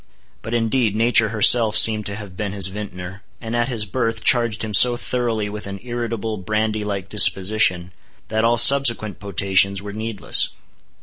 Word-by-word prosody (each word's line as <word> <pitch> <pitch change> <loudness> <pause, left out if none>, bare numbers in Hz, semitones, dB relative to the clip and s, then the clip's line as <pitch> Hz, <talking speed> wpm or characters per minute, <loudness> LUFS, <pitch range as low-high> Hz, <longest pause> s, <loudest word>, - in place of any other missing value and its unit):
But 115 +1 -5
indeed, 115 -1 -1
nature 115 -1 +2
herself 110 0 +3
seemed 110 -1 +3
to 100 - -5
have 100 -3 -11
been 100 0 -5
his 95 -2 +1
vintner, 95 -1 -9 0.2
and 115 0 -7
at 120 +2 -1
his 115 -4 -2
birth 115 +2 -4
charged 115 -3 +1
him 110 -1 -6
so 120 +5 +5
thoroughly 120 -4 -3
with 105 0 -8
an 100 0 -8
irritable, 115 -3 -5
brandy 105 +2 -3
like 100 -3 -5
disposition, 95 -3 +2 0.4
that 110 0 -2
all 120 +1 +1
subsequent 120 -4 +3
potations 100 0 0
were 100 +1 -9
needless. 110 -1 +1
110 Hz, 165 wpm, -19 LUFS, 100-115 Hz, 0.4 s, so